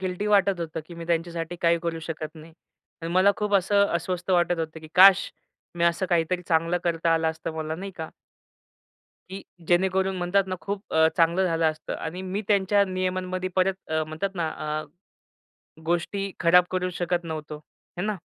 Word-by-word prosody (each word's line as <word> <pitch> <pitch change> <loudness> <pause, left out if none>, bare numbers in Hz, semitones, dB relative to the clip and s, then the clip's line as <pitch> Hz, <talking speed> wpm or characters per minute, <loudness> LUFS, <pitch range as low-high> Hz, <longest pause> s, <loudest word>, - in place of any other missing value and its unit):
Guilty 185 +2 -3
वाटत 200 -3 +3
होतं, 165 -1 -4
की 170 - -11
मी 170 0 -7
त्यांच्यासाठी 170 0 -2
काही 170 0 +3
करू 165 -1 -2
शकत 155 -1 -6
नाही. 160 +1 -13 0.5
आणि 165 +1 -4
मला 190 +2 +5
खूप 210 -1 -1
असं 200 +1 +4
अस्वस्थ 180 +2 -2
वाटत 175 -1 +2
होतं, 160 0 -4
की 155 - -12
काश! 190 +1 +7 0.4
मी 170 - 0
असं 170 +2 +1
काहीतरी 175 +1 0
चांगलं 165 +1 +2
करता 165 -1 +1
आलं 160 0 +1
असतं 160 0 -6
मला 155 0 -3
नाही 195 +3 -6
का? 160 -1 -5 1.2
की 195 +1 -7 0.3
जेणेकरून 190 +2 +2
म्हणतात 180 +2 +1
ना 185 - -3
खूप 200 +1 -6
अ, 160 0 +6
चांगलं 170 +2 +3
झालं 165 -1 0
असतं. 155 0 -8
आणि 165 +3 -5
मी 190 +3 -3
त्यांच्या 200 0 +3
नियमांमध्ये 185 0 -2
परत 190 +1 +3
अ, 160 0 0
म्हणतात 155 +5 -3
ना 165 -3 -1 0.3
अ, - - -11 1.0
गोष्टी 190 +4 -1
खराब 175 +1 +6
करू 185 0 -1
शकत 175 0 -2
नव्हतो. 155 -2 -6 0.4
आहे 180 +4 -2
ना? 210 -2 -1
175 Hz, 175 wpm, -25 LUFS, 165-190 Hz, 1.2 s, काश